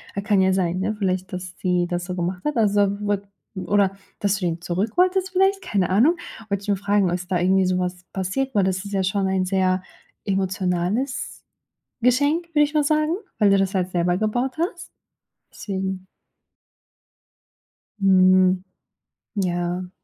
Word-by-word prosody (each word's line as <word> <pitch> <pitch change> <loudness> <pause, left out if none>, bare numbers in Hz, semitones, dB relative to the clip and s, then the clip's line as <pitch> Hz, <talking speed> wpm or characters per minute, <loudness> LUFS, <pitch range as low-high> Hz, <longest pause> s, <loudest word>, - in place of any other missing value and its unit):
A 200 - -1
kann 205 -1 +2
ja 190 0 +3
sein, 185 -1 0
ne, 210 +3 -1
vielleicht, 185 -2 -2
dass 180 0 -6
sie 180 -1 +1
das 175 0 -3
so 180 0 -4
gemacht 180 +1 -3
hat, 300 - 0
also 205 -2 +2
wurd 205 -1 -1 0.3
oder 195 0 +1 0.2
dass 200 -1 +1
du 185 - -2
ihn 170 -1 -2
zurück 185 +5 -1
wolltest, 370 +1 +2
vielleicht, 385 +1 +2
keine 200 - 0
Ahnung. 250 - +4 0.3
Wollt 200 0 -1
ich - - -10
nur 200 - +2
fragen, 200 -1 +1
ob 175 - 0
es 180 0 -6
da 185 -1 0
irgendwie 190 +2 +3
so 185 0 +1
was 180 0 -4
passiert, 210 +8 -2
weil 200 - +4
das 190 +1 -1
ist 200 - -7
ja 195 -1 +1
schon 190 +1 0
ein 190 -1 0
sehr 185 -1 +1 0.4
emotionales 190 +5 -1 0.6
Geschenk, 285 +8 +2
würde 295 - +5
ich 295 +1 -5
mal 300 - +3
sagen, 305 +3 +1 0.2
weil 210 -2 +4
du 195 - +5
das 195 +1 0
halt 185 -1 0
selber 175 0 +1
gebaut 245 +5 -1
hast. 345 +2 -3 0.6
Deswegen. 190 -2 -4 1.9
Hm. 185 -1 +4 0.7
Ja. 180 -2 -2
190 Hz, 170 wpm, -23 LUFS, 185-215 Hz, 1.9 s, würde